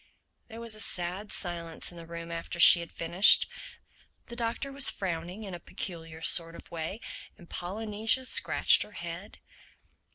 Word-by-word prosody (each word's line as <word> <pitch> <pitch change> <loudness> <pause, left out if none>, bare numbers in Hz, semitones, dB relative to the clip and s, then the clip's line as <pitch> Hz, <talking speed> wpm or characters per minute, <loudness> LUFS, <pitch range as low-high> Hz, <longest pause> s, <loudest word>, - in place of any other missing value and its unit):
There 225 -1 -11
was 230 -1 -6
a 215 - -9
sad 185 +1 -4
silence 170 -3 -4
in 175 - -14
the 165 - -12
room 170 0 -8
after 170 +1 -6
she 170 - +10
had 170 -1 -8
finished; 170 +5 +5 0.8
the 235 - -8
Doctor 235 +4 -4
was 275 0 +5
frowning 180 +2 -5
in 195 -3 -7
a 175 - -7
peculiar 165 -3 -8
sort 165 0 +3
of - - -14
way 170 +5 -5 0.4
and 175 - -16
Polynesia 215 +8 -2
scratched - - +4
her 210 - -5
head. 175 +2 -8
175 Hz, 160 wpm, -28 LUFS, 170-215 Hz, 0.8 s, she